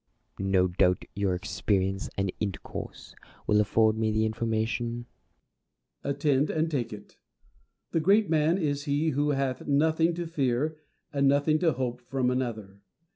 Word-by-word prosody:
Plato. 95 0 -3
No 95 -1 +4
doubt 90 0 +1
your 100 -3 0
experience 95 +1 -1
and 95 -2 -1
intercourse 100 -5 -6 0.3
will 105 0 +4
afford 110 +1 +2
me 110 -1 +1
the 110 +1 +1
information. 115 +2 -2 1.0
Diogenes. 140 0 -2
Attend, 140 0 +2
and 160 +1 0
take 120 -6 -1
it. 105 -1 -11 0.7
The 165 - +1
great 200 +6 +4
man 160 +2 +2
is 145 -5 -1
he 145 +2 +1
who 145 0 0
hath 135 -2 -1
nothing 160 +3 +2
to 175 0 -3
fear 150 -1 0 0.4
and 140 -1 +3
nothing 145 +3 +3
to 165 -3 +2
hope 125 -1 -3
from 125 0 -1
another. 110 -6 -3
130 Hz, 150 wpm, -28 LUFS, 110-150 Hz, 1.0 s, No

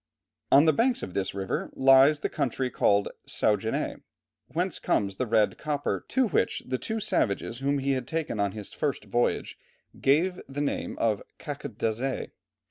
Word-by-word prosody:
On 140 +3 +7
the 155 - +5
banks 245 +2 +1
of 90 - -6
this 95 0 -2
river 95 -1 -2
lies 135 +3 +6
the - - +1
country 130 0 -2
called 100 0 +2 0.2
Saguenay, 110 +1 0 0.5
whence - - -2
comes 100 -2 0
the 130 - -1
red 110 -1 +2
copper, 145 -2 -2
to 260 -2 +2
which 165 - 0
the 130 0 -2
two 220 - -2
savages 115 - 0
whom 140 +1 +1
he 140 0 0
had 130 -2 -1
taken 160 -8 -2
on 100 -1 +1
his 105 -2 -8
first 140 -7 -2
voyage 120 +4 -1 0.4
gave 175 +7 +2
the 140 +1 -5
name 145 - -2
of 110 -3 +1 0.2
caquetdazé. 120 +4 -3
130 Hz, 160 wpm, -27 LUFS, 105-145 Hz, 0.5 s, On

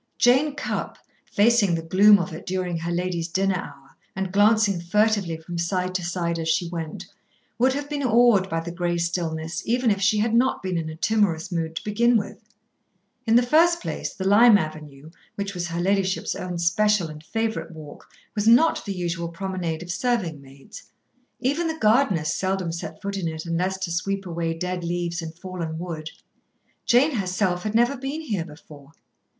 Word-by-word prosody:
Jane 270 +4 +3
Cupp, - - -4 0.3
facing 205 -4 +3
the 165 - -4
gloom 200 +5 +6
of 180 -2 -4
it 160 - -9
during 185 -1 -2
her 170 +1 -3
lady's 175 -1 -2
dinner 190 +2 0
hour, 140 -6 -10 0.3
and 190 0 -3
glancing 205 -2 +3
furtively 200 -2 +1
from 170 +2 -7
side 180 +1 -1
to 185 -1 -2
side 170 -1 -2
as 160 0 -2
she 170 +2 +1
went, 170 +2 -6 0.5
would 260 +2 +4
have 285 +1 -4
been 290 -1 -3
awed 235 -6 +4
by 165 -1 -1
the 170 +1 -6
grey 175 0 -1
stillness, 170 -1 -2
even 240 0 +1
if 200 -1 -1
she 210 +2 +3
had 220 +2 +1
not 245 -1 +2
been 185 -1 -2
in 165 -2 -2
a 155 - -7
timorous 185 -3 0
mood 165 -2 -2
to - - -4
begin 235 +3 +3
with. 205 +2 -5 0.9
In 225 - +4
the 245 - +6
first 335 +6 +4
place, - - -4
the 190 -1 -4
Lime 215 +2 +7
Avenue, 155 -3 -7 0.2
which 200 0 -4
was 175 -2 -3
her 170 0 -4
ladyship's 190 +1 0
own 180 -1 -5
special 180 +2 +2
and 155 0 -10
favourite 225 +4 -2
walk, 155 -3 -12 0.2
was 210 0 -1
not 245 +8 +5
the 200 -2 -4
usual 170 -1 -3
promenade 175 -2 -4
of 175 - -6
serving 185 - -1
maids. 135 0 -13 0.6
Even 290 +7 0
the 320 0 -3
gardeners 210 - +2
seldom 190 -2 -1
set 165 -1 -6
foot 200 0 -3
in 180 -4 -2
it 160 0 -5
unless 180 +3 -1
to 190 -2 -4
sweep 195 +3 -2
away 165 -2 -2
dead 180 +1 -3
leaves 170 0 -2
and 160 0 -7
fallen 175 -3 -5
wood. 165 -2 -5 0.8
Jane 260 +6 +5
herself 185 -2 0
had 215 +3 -3
never 240 +4 +3
been 275 +4 -4
here 205 - -3
before. 150 -2 -14
185 Hz, 185 wpm, -24 LUFS, 170-215 Hz, 0.9 s, Lime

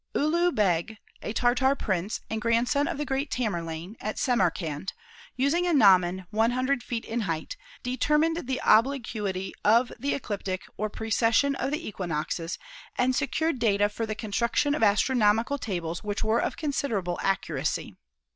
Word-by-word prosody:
Ulugh 340 +4 +2
Begh, 200 +1 +1 0.2
a - - -4
Tartar 250 +4 +2
prince 195 -4 -2
and 220 0 -3
grandson 240 +6 +2
of 340 -3 -3
the 295 - -2
great 270 +1 -1
Tamerlane, 175 -4 -3
at 215 - -3
Samarkand, 185 - 0 0.4
using 310 +7 +1
a 345 - +2
gnomon 185 -6 +5
100 245 +4 +1
feet 230 -1 -4
in 235 - -2
height, 180 - -3 0.3
determined 300 +5 +1
the 260 -1 -1
obliquity 215 -6 +1
of 230 +4 +4
the 280 +4 0
ecliptic 200 -7 -4
or 215 +2 -2
precession 225 +5 +2
of 270 - -2
the 305 +4 -3
equinoxes, 165 -2 -3 0.4
and 255 +1 +2
secured 295 +1 0
data 205 -3 +3
for 225 +2 -4
the 215 - -3
construction 235 +7 0
of 295 - -2
astronomical 225 +4 +3
tables 175 -7 -4
which 205 0 -2
were 220 +2 +2
of - - -2
considerable 240 - -2
accuracy. 195 0 -1
225 Hz, 145 wpm, -27 LUFS, 195-270 Hz, 0.4 s, gnomon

